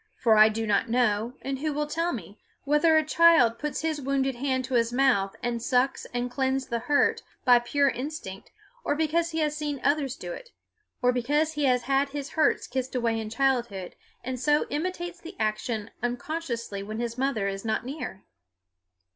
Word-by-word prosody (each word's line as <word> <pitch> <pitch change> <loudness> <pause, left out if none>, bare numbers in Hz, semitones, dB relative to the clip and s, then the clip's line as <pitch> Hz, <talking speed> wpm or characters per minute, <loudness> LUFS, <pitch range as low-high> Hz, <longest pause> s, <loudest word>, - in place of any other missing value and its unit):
For 225 -3 +3
I 215 0 +8
do 225 +1 -2
not 210 +1 +1
know, 235 -1 +1
and 270 -1 -3
who 305 +1 -1
will 300 +1 -1
tell 330 +3 -1
me, 205 - -7 0.2
whether 300 +3 +4
a 315 - +2
child 310 -8 +5
puts 300 0 -3
his 315 -2 -1
wounded 270 0 0
hand 260 0 -1
to 260 - -6
his 230 -1 +2
mouth 245 -7 +2
and 240 -1 -1
sucks 250 +3 +1
and 245 0 -3
cleanses 265 +1 -1
the 235 - -1
hurt 285 +5 +2 0.2
by 245 -2 +7
pure 280 +4 +1
instinct, 260 -8 -5 0.3
or 290 - 0
because 320 +2 +1
he 325 -1 -2
has 300 -1 0
seen 295 -2 -3
others 280 -2 +1
do - - -6
it, - - -10 0.5
or 250 - +5
because 295 +6 +1
he 295 -2 0
has 250 -2 +2
had 275 +1 +1
his 285 0 -5
hurts 315 - +2
kissed 260 0 -4
away 230 -2 0
in 220 -1 -5
childhood, 235 -6 -1 0.3
and 255 0 -4
so 295 +3 +2
imitates 350 +2 -3
the 340 +3 -10
action 215 0 -2
unconsciously 240 -4 -3
when 215 +3 -6
his 235 -1 -3
mother 255 -6 0
is 195 0 -4
not 225 +2 -1
near? 260 -8 -6
260 Hz, 190 wpm, -27 LUFS, 235-295 Hz, 0.5 s, I